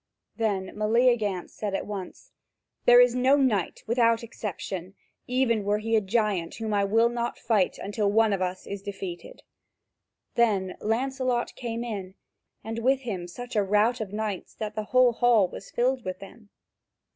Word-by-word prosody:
Then 200 -4 -1
Meleagant 215 -3 +1
said 205 -2 -3
at - - -3
once: 200 -3 -7 0.5
"There 245 0 +8
is 245 -1 +6
no 255 +3 +4
knight 225 - 0
without 230 0 +2
exception, 195 -4 -6 0.3
even 250 -4 +1
were 205 +1 +1
he 225 +2 0
a 220 - +4
giant, 200 -4 0
whom 220 -2 -3
I 200 -1 +2
will 225 +3 +4
not 240 0 -3
fight 215 -5 +1
until 205 0 -1
one 220 0 +4
of 195 - -1
us 185 0 -3
is 200 -1 -6
defeated." 190 -4 -7 0.9
Then 200 -6 +1
Lancelot 250 +2 -1
came 235 -1 -4
in, 195 -5 -6 0.5
and 225 +1 -4
with 260 +3 +2
him 195 -8 -4
such 245 +7 -8
a 210 - +4
rout 210 +5 +2
of 205 -3 -5
knights 210 -3 -4
that 215 -1 -4
the 215 0 -4
whole 255 +1 +4
hall 230 -5 +4
was 195 - -10
filled 250 +1 0
with 185 0 -4
them. 205 +2 -13
220 Hz, 165 wpm, -27 LUFS, 200-240 Hz, 0.9 s, There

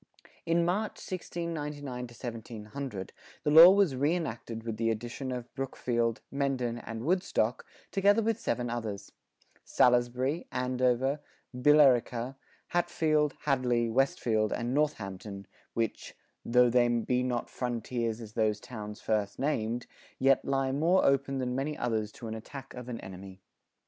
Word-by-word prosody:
In 170 +1 +3
March, 205 +5 0
1699 155 -6 -5
1700, 115 -2 -7 0.3
the 150 - +1
law 165 +3 +11
was 195 -6 +4
reënacted 130 -6 -2
with 115 -2 -4
the 115 0 +1
addition 120 +4 -3
of 125 -1 -6
Brookfield, 120 -3 -1
Mendon, 130 -4 -1
and 115 -1 -6
Woodstock, 165 - 0 0.2
together 205 +3 +4
with 225 0 0
seven 120 +1 -1
others, 105 -4 -5 0.5
Salisbury, 125 +5 +2
Andover,[42:3] 125 +1 -1
Billerica, 130 -3 +4 0.3
Hatfield, 160 -4 +1
Hadley, 125 -4 +1
Westfield, 110 -4 +1
and 120 +1 -2
Northampton, 100 -9 -2 0.3
which, 115 -2 -2 0.3
"tho' 125 0 +4
they 120 0 +4
be 120 +1 +1
not 125 -1 -1
frontiers 120 -2 -2
as 110 -1 -9
those 110 -2 +1
towns 105 -3 -8
first 105 -2 -1
named, 120 -4 -1 0.3
yet 135 0 +4
lye 135 -1 0
more 165 +7 +3
open 135 0 +2
than 125 -1 -1
many 140 +4 -2
others 110 -3 -1
to 115 - -8
an 110 - -4
attack 135 +4 -9
of 125 0 -8
an 115 -2 -4
Enemy." 95 0 -10
125 Hz, 130 wpm, -30 LUFS, 115-145 Hz, 0.5 s, law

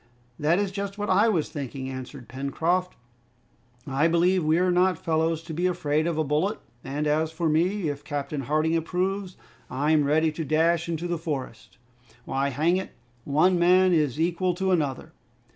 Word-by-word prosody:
"That 155 +4 +2
is 200 -1 0
just 200 0 -5
what 205 -1 -2
I 205 +5 +4
was 170 -8 0
thinking," 135 -2 -6
answered 130 -1 -8
Pencroft. 165 +7 -1 0.9
"I 140 +3 +1
believe 175 +2 +2
we're 170 +4 +2
not 180 0 +3
fellows 160 0 0
to 165 -1 -7
be 175 +4 0
afraid 155 -3 0
of 170 -2 -1
a 155 - +2
bullet, 155 +9 0 0.3
and 145 +3 -3
as 155 +2 +1
for 165 +1 -2
me, 170 +4 +1
if 145 0 -4
Captain 145 0 -4
Harding 155 +4 +1
approves, 185 +3 -2 0.3
I'm 150 +3 +2
ready 155 +3 +2
to 160 +2 -4
dash 165 +3 +1
into 165 +1 -2
the 175 -1 -2
forest! 130 - -6 0.5
Why, 135 +1 -1
hang 155 +7 +1
it, 190 - -5 0.3
one 175 +6 +3
man 180 +1 +5
is 150 -4 +1
equal 175 +2 0
to 190 +1 0
another!" 145 -7 -1
160 Hz, 170 wpm, -26 LUFS, 150-180 Hz, 0.9 s, man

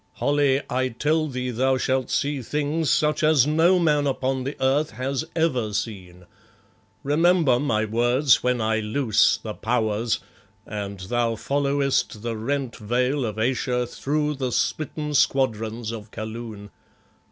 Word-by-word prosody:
"Holly, 140 -1 +1
I 130 +1 0
tell 155 +6 0
thee 125 -2 -3
thou 130 +3 +1
shalt 130 0 0
see 145 -1 -1
things 150 +4 -1
such 150 0 +2
as 155 -4 +4
no 165 +5 +4
man 150 -4 +2
upon 130 -1 -1
the 140 - -3
earth 135 +3 +2
has 135 +3 -3
ever 130 -10 0
seen. 95 -4 -5 0.8
Remember 155 -3 +3
my 110 -6 0
words 120 +5 +3
when 125 -1 +1
I 110 0 +1
loose 110 0 +2
the 110 - -6
Powers 110 0 0 0.5
and 100 -2 -6
thou 115 +4 0
followest 140 -3 0
the 115 -1 -2
rent 130 +2 -3
veil 125 +5 0
of 105 -1 -5
Ayesha 125 +1 0
through 150 +4 -1
the 130 -3 -3
smitten 150 +3 -2
squadrons 115 -5 +1
of 110 -2 -8
Kaloon. 110 -2 -7
130 Hz, 140 wpm, -24 LUFS, 110-145 Hz, 0.8 s, as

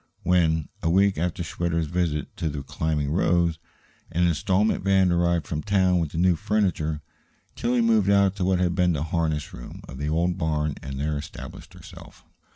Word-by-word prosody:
When, 80 -4 +2
a 80 - 0
week 95 +1 +3
after 85 +1 -2
Schwitter's 85 0 -1
visit 80 -2 -2
to 80 - -1
the 70 -2 -5
"Climbing 75 0 -2
Rose," 85 -1 +2 0.5
an 90 +1 +2
installment 95 +6 +1
van 95 -2 +3
arrived 85 -1 +1
from 75 -1 -3
town 95 -2 +2
with 80 -3 -1
the - - -6
new 90 +1 +4
furniture, 80 -6 -1 0.5
Tillie 120 0 +1
moved 110 -4 +3
out 100 -1 +4
to 95 - -1
what 95 0 +2
had 90 -1 +1
been 90 -1 +2
the 75 -1 -1
harness 80 -2 -2
room - - -10
of 65 - -9
the 75 +1 -2
old 85 +3 0
barn 75 -2 0
and 70 0 -6
there 75 0 -1
established 75 -3 -10
herself. - - -14
85 Hz, 180 wpm, -25 LUFS, 75-90 Hz, 0.5 s, new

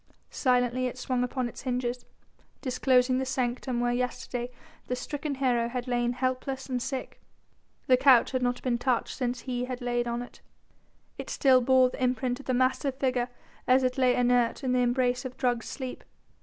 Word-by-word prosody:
Silently 250 -1 +1
it 250 - -6
swung 250 -1 -1
upon 250 0 -2
its - - -9
hinges, 250 -1 -2 0.5
disclosing 255 -1 +2
the - - 0
sanctum 255 -1 -2
where 240 0 +1
yesterday 250 0 -3 0.4
the 250 - -1
stricken 290 +3 -4
hero 245 -3 +1
had 250 +1 -4
lain 240 -1 0
helpless 260 +1 -2
and 250 -2 -2
sick. 260 +1 -5 0.6
The 255 - +5
couch 260 -3 +5
had 255 -1 -1
not 245 0 -1
been 240 -2 0
touched 245 -2 0
since 250 -1 -2
he 250 -1 -3
had 250 -1 -5
lain 240 -1 -1
on 235 +1 -2
it. 245 - -14 0.8
It - - -6
still 260 -2 +4
bore 255 0 +4
the - - -8
imprint 250 0 0
of 280 - -13
the 255 - +1
massive 260 +2 +1
figure 255 -2 0 0.4
as 260 +1 +5
it 255 +1 0
lay 255 -1 +4
inert 245 +1 +2
in 255 - 0
the 250 - +2
embrace 250 0 +1
of 255 -1 -7
drugged 245 -2 0
sleep. 260 -3 -6
250 Hz, 185 wpm, -28 LUFS, 245-260 Hz, 0.8 s, The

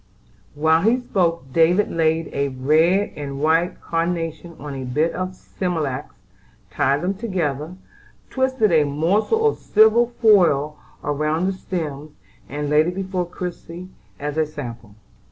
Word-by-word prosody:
While 160 +2 +3
he 225 +6 +3
spoke 170 - -1
David 175 +5 +3
laid 165 0 0
a 140 0 0
red 155 +9 +2
and 140 -2 -6
white 165 +4 +1
carnation 165 0 -3
on 145 -1 -7
a 135 -1 -5
bit 150 +7 0
of 185 0 -4
smilax, 155 -8 -4 0.6
tied 140 - +1
them 185 +2 0
together, 175 - -3 0.6
twisted 260 -6 +1
a 160 -2 +5
morsel 180 - +1
of 445 - -1
silver 220 +2 +4
foil 175 - +3 0.2
about 150 +4 0
the 195 - 0
stems, 155 -6 -5 0.4
and 145 +1 -3
laid 150 +2 +3
it 180 - -3
before 185 -2 -2
Christie 175 0 -7 0.3
as 145 +1 -4
a 155 -1 +2
sample. 115 -8 -8
165 Hz, 135 wpm, -21 LUFS, 145-185 Hz, 0.6 s, a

